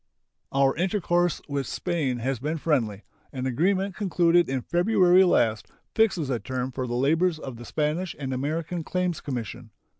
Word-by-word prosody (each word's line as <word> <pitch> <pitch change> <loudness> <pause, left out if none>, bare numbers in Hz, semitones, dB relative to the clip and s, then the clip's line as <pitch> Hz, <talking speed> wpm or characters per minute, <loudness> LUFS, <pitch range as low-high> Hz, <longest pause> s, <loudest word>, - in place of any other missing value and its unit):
Our 135 0 +3
intercourse 175 -1 +1
with 140 -3 -2
Spain 155 -8 -1
has 130 +1 -2
been 155 +5 -2
friendly. 115 -10 0 0.3
An 130 -2 -4
agreement 185 +9 0
concluded 175 -4 +2
in 130 -2 -2
February 185 0 +4
last 110 - +2 0.3
fixes 185 -11 +2
a 120 - 0
term 130 +1 -3
for 130 0 -4
the 120 - -3
labors 160 +7 +2
of 130 -6 -8
the 120 - -10
Spanish 155 +6 -2
and 135 -2 -4
American 160 +5 -2
Claims 180 -1 -2
Commission. 120 -7 -5
155 Hz, 155 wpm, -26 LUFS, 130-175 Hz, 0.3 s, February